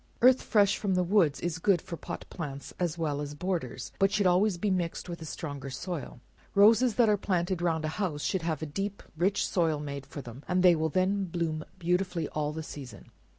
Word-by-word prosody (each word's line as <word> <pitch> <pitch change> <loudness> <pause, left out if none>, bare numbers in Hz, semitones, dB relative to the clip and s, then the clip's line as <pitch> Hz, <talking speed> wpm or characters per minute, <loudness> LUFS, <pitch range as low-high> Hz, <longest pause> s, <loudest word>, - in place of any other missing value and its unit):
Earth 255 +1 +7
fresh 200 -2 +3
from 195 -3 0
the 180 - +3
woods 175 -6 +3
is 170 -1 -2
good 195 0 +3
for 170 - -7
pot - - -7
plants, 140 -5 -6
as 175 -3 -1
well 150 -3 -1
as 145 0 -5
borders, 145 -8 -3
but 195 0 +4
should 205 -1 +1
always 185 +2 +3
be 205 +3 0
mixed 175 -2 -2
with 170 -1 -6
a - - -6
stronger 145 -4 -5
soil. 155 -1 -5 0.4
Roses 220 +3 +6
that 235 -1 +5
are 210 -1 +4
planted 180 -2 -1
round 160 -2 0
a 155 +7 -3
house, 150 -7 -1
should 190 - 0
have 160 -1 -2
a - - -1
deep 195 +7 -4
and - - -25
rich 195 +3 +2
soil 165 -4 +1
made 140 -2 -6
for 140 0 -7
them, 120 +3 -9
and 180 0 +2
they 180 -2 +7
will 160 0 0
then 190 +4 +1
bloom 165 -3 -2
beautifully 180 -2 0
all 150 -1 -2
the 160 +1 -5
season. 130 -9 -10
170 Hz, 220 wpm, -29 LUFS, 150-190 Hz, 0.4 s, Earth